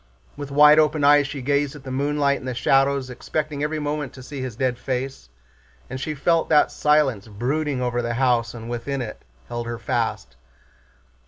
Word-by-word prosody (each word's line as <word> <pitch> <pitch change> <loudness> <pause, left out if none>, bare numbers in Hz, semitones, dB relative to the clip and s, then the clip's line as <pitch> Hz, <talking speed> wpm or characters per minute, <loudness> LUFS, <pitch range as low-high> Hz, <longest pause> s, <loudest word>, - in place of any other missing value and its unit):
With 145 -1 -7
wide 150 +2 +7
open 155 -1 +2
eyes 145 0 +5
she 140 -2 -6
gazed 140 +1 0
at 145 - -11
the 130 - -7
moonlight 140 +1 +1
and 130 - -9
the 130 - -3
shadows, 135 +1 +2
expecting 150 +3 -4
every 150 +1 -1
moment 150 -2 -3
to 130 - -11
see 135 +1 -7
his 130 -4 -5
dead 125 0 -1
face, 130 - -4 0.6
and 130 0 -5
she 155 +1 -3
felt 165 +3 +1
that 150 - +5
the - - -14
silence 145 -8 +2
brooding 130 +5 -2
over 120 -1 -1
the 120 0 -2
house 120 -2 +1
and 115 -1 -8
within 125 +3 -3
it 110 - -8 0.3
held 120 0 -5
her 120 0 -4
fast. 65 - -3
135 Hz, 190 wpm, -23 LUFS, 125-145 Hz, 0.6 s, wide